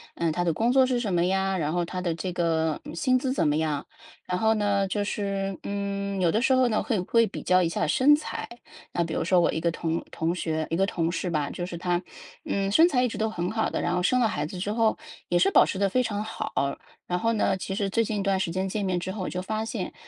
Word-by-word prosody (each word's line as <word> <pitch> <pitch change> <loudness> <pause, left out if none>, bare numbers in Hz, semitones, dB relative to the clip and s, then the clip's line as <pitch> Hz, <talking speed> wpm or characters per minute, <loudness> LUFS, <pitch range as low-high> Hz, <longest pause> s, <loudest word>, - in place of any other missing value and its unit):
呃， 170 - 0
他 175 - 0
的 170 - +2
工 235 +9 +1
作 265 -1 +6
是 255 -1 0
什 210 -6 -2
么 175 0 +3
呀， 190 +1 +1
然 155 -2 -1
后 175 +1 0
他 180 +2 -5
的 175 -2 -1
这 180 +2 -4
个 160 -3 0
薪 255 +10 +2
资 255 0 -1
怎 260 - +1
么 150 - +2
样。 155 -2 -1 0.4
然 180 - 0
后 220 +3 +3
呢， 205 -2 +1
就 205 +1 -1
是， 195 -2 -2
嗯， 200 -1 -3
有 175 -2 +3
的 215 +7 +1
时 265 - +2
候 255 -1 +4
呢， 220 -3 0
会 225 -6 0
会 230 +6 +3
比 - - -7
较 185 0 +3
一 165 - +1
下 210 +5 -1
身 280 +3 +5
材， 295 - -2 0.5
那 175 - -1
比 165 -1 -2
如 - - 0
说 180 +2 +3
我 170 - +3
一 160 - -2
个 170 +1 +1
同 165 0 -2
同 165 +2 -1
学， 160 -3 -2
一 165 - 0
个 190 +3 +3
同 165 -4 -1
事 180 +1 -2
吧， 150 -4 -1
就 175 - -4
是 175 -1 -6
她， 175 +1 -1 0.4
嗯， 195 0 -1
身 320 +11 +6
材 250 -6 +2
一 - - +2
直 230 - -6
都 220 0 0
很 180 -4 -3
好 220 0 0
的， - - -2
然 175 - 0
后 180 - 0
生 250 +7 +3
了 235 - +4
孩 150 - -2
子 175 +5 -7
之 200 +3 -2
后 225 -1 +2 0.3
也 175 - +3
是 190 - +4
保 - - +6
持 190 - -3
得 200 - +3
非 255 +6 +1
常 210 -3 -2
好。 220 +1 -5 0.6
然 180 - 0
后 230 +5 +1
呢， 210 -3 +1
其 190 +1 -5
实 195 0 -1
最 230 +4 +2
近 215 -1 -2
一 - - 0
段 195 -1 +2
时 185 -3 -1
间 185 +2 -1
见 205 +2 -2
面 185 -2 0
之 185 +2 -4
后 205 - -5
我 - - -3
就 180 - -3
发 215 +3 -2
现， 225 - -4
190 Hz, 300 characters per minute, -26 LUFS, 175-215 Hz, 0.6 s, 作